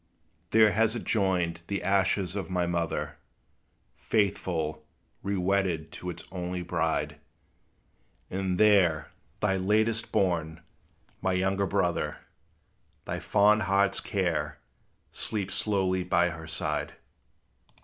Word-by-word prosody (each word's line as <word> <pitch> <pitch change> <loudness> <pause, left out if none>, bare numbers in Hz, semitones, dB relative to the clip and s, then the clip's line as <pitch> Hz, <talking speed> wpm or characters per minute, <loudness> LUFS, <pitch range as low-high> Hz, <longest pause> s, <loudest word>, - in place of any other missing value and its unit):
There 110 +1 +6
has 110 +3 +2
it 120 - -4
joined 90 -5 0
the 100 -3 -2
ashes 95 -1 +1
of 95 -5 -3
my 90 -1 +1
mother, 85 -2 -2 0.8
Faithful, 85 -7 -1 0.4
rewedded 95 -4 0
to 90 - -6
its 85 -1 -7
only 90 -1 -3
bride; 80 -2 -1 1.1
And 95 -1 -1
there 90 -8 +4 0.3
thy 95 -2 +2
latest 110 +4 +1
born, 85 -5 0 0.6
my 95 0 +1
younger 95 +1 +1
brother, - - 0 0.9
Thy - - -3
fond 105 +2 +4
heart's 100 0 +3
care, 80 -6 -1 0.5
sleeps 100 -3 -2
closely 95 -3 +1
by 90 -1 +2
her 80 -1 -8
side. 80 - -2
95 Hz, 110 wpm, -28 LUFS, 85-100 Hz, 1.1 s, There